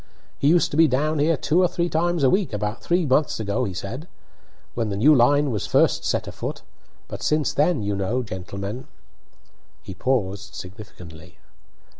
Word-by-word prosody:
"He 140 - +1
used 170 +3 +3
to 145 - -3
be 165 0 +6
down 150 +3 0
here 155 +2 +2
two 170 +6 +2
or 180 - +4
three 170 0 -1
times 170 -1 0
a 130 - +5
week 190 - 0
about 105 +2 -3
three 175 0 +1
months 135 -1 +1
ago," 100 -2 -1
said 100 +8 -6
he, 165 - -15 0.7
"when 115 -2 -2
the 100 - -3
new 145 +9 +6
line 145 +2 +3
was 105 -4 -3
first - - +2
set - - -1
afoot; - - -6 0.4
but - - -8
since 150 -1 +1
then, 150 -5 +1
you 100 0 -1
know, 110 +6 -1
gentlemen 100 +3 -6 0.5
" - - -37
He - - -8
paused 100 -3 -2
significantly. 90 -5 -11
125 Hz, 180 wpm, -23 LUFS, 100-155 Hz, 0.7 s, be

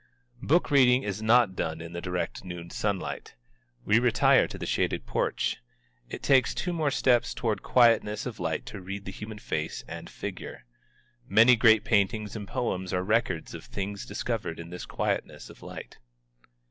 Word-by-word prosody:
Book 160 +3 +2
reading 130 -2 +5
is 100 +1 -4
not 110 -3 +4
done 80 -2 -3
in 85 +1 -8
the 85 - -5
direct 90 +1 -3
noon 85 -2 -8
sunlight. 100 -3 -3 0.5
We 110 +3 +4
retire 120 -2 +4
to - - -8
the - - -5
shaded - - -1
porch. - - -1 0.5
It - - -7
takes 130 -3 +3
two 180 - -2
more 155 -3 +1
steps 125 -3 +2
toward 110 -3 -1
quietness 115 -4 +3
of 115 -3 -6
light 80 -2 -2
to 100 - -8
read 100 +2 -6
the 95 - -5
human 105 +2 -8
face 75 -6 -4
and - - -8
figure. - - -7 0.6
Many 115 +5 +6
great 110 -2 +5
paintings 105 0 +1
and 105 -2 -6
poems 95 -7 -2
are 90 0 0
records 110 +4 0
of - - -8
things 100 +1 -5
discovered 105 -5 -3
in 85 +1 -8
this 90 - -7
quietness - - -3
of - - -17
light. - - -10
105 Hz, 170 wpm, -28 LUFS, 95-120 Hz, 0.6 s, Many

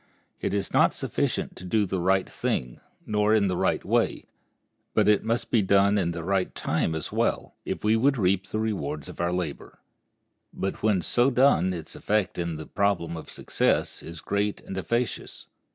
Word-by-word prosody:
It - - -2
is 100 -1 -2
not - - +4
sufficient - - -2
to - - -9
do 105 +3 +1
the 95 -1 -2
right 95 +2 +2
thing, 60 -1 -2 0.3
nor 105 0 +2
in 100 -2 +3
the 90 - 0
right - - 0
way, - - +1 0.7
but - - +4
it 105 -1 +4
must 115 +1 -1
be 115 - +4
done 100 +1 +4
at 85 -3 0
the 85 -1 -5
right 95 +1 0
time 80 - 0
as 80 - -4
well, - - 0
if - - -4
we 105 +1 +4
would 135 +4 +3
reap 95 -1 +1
the - - -3
rewards 75 -10 -2
of - - -6
our 85 0 +1
labor. 90 -5 -4 0.7
But 95 - -4
when 105 -5 +2
so 120 - +3
done 125 - +4
its 85 -3 -6
effect 105 -3 0
in 85 -1 -2
the 80 0 -7
problem 100 -5 0
of 80 - -8
success - - 0
is 85 -1 -8
great 100 0 -1
and 95 - -8
efficacious. 120 +5 -2
95 Hz, 185 wpm, -26 LUFS, 85-105 Hz, 0.7 s, not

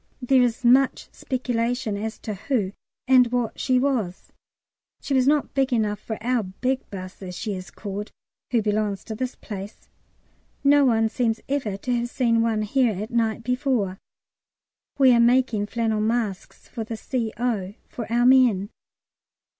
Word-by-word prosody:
There 260 0 +3
is 245 0 0
much 255 +2 +4
speculation 245 -3 -2
as 220 +2 -4
to 215 - -4
who 205 -1 -1 0.4
and 250 -2 +5
what 245 -3 -1
she 255 -1 +2
was; 250 -9 -1 0.7
she 280 - -4
was 260 -1 +3
not 295 0 +2
big 270 -1 +1
enough 210 -4 0
for 220 0 -5
our 245 +1 +1
big 250 +7 -3
"'Bus," 185 -1 -8
as 180 -2 -7
she 215 - -3
is 185 -1 -7
called, 205 0 -6 0.4
who 235 -3 +1
belongs 210 -2 -1
to 220 - -6
this 255 +2 -3
place. 200 -1 -9 0.7
No 285 0 +5
one 225 -3 +3
seems 225 0 0
ever 260 -8 -2
to 245 +5 -2
have 240 0 -2
seen 230 -3 +2
one 225 -2 +1
here 240 +1 +2
at 215 +3 -5
night 230 -1 0
before. 250 -6 -1 1.0
We 265 -2 +6
are 235 - +4
making 235 -3 +3
flannel 220 -1 -1
masks 220 -3 -2
for 230 - -5
the 225 0 -6
C.O. 220 -5 -2
for 230 -2 -7
our 240 +1 +3
men. 245 -6 +4
230 Hz, 160 wpm, -24 LUFS, 210-255 Hz, 1.0 s, We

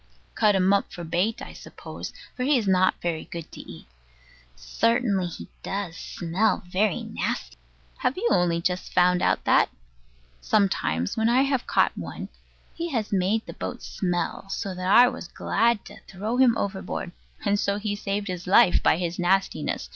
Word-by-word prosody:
Cut 210 -2 +3
him 190 +1 +3
up 200 - +1
for 175 -3 -7
bait, 175 +7 -1
I - - -9
suppose, - - -9 0.2
for - - -6
he 275 +2 +3
is 220 -4 -1
not 185 0 +3
very 170 -2 -2
good 170 -2 -8
to - - -11
eat. - - -12 0.7
Certainly, 200 - +1
he 170 - -8
does 195 -4 -4
smell 175 +6 -1
very 190 +1 0
nasty. - - -3 0.4
Have 260 - 0
you 455 +5 0
only 170 -1 +2
just 180 +1 -2
found 180 0 +4
out - - +1
that? - - +4 0.7
Sometimes 145 - +1
when 220 +1 +2
I 255 +3 +4
have 275 -2 -1
caught - - +2
one, - - -6 0.4
he 340 +1 -4
has 225 -8 -2
made 200 +4 +1
the - - -8
boat - - -6
smell 175 +1 -2
so 195 -1 -3
that 185 0 -3
I 245 +5 +8
was 250 -8 -5
glad 230 +2 +1
to - - -11
throw 210 +6 -3
him 250 -3 +5
overboard, 190 -2 -3 0.3
and 205 0 +2
so 200 0 0
he 205 0 -2
saved 205 0 -3
his 180 -2 -5
life 180 -1 +5
by - - +3
his 175 0 -3
nastiness. 190 +2 0
195 Hz, 175 wpm, -25 LUFS, 180-220 Hz, 0.7 s, I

